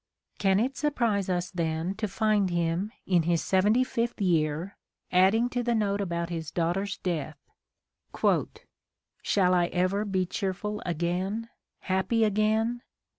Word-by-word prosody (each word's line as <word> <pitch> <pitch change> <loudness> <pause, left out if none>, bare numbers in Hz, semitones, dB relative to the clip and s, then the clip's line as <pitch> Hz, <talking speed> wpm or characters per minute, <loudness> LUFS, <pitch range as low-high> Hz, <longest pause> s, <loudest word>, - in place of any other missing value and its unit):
Can 195 -1 +3
it 260 +5 0
surprise 230 -10 0
us 180 -1 -1
then 165 0 -1
to 215 - -1
find 205 -1 +1
him, 175 +4 -1
in 180 -3 +3
his 170 0 +1
seventy 205 +6 +3
fifth 235 -2 -2
year, 165 -1 0 0.4
adding 195 +6 +4
to 245 0 -1
the 240 -1 0
note 205 -2 0
about 170 -2 -2
his 160 -3 -4
daugh 170 0 0
ter's 195 +1 -3
death: 155 -4 -3 1.8
"Shall 185 -3 +2
I 175 -1 +3
ever 185 +3 0
be 190 -3 0
cheerful 200 +3 -3
again, 180 +7 -2 0.3
happy 190 +4 +1
again? 220 +3 +1
190 Hz, 135 wpm, -28 LUFS, 175-215 Hz, 1.8 s, adding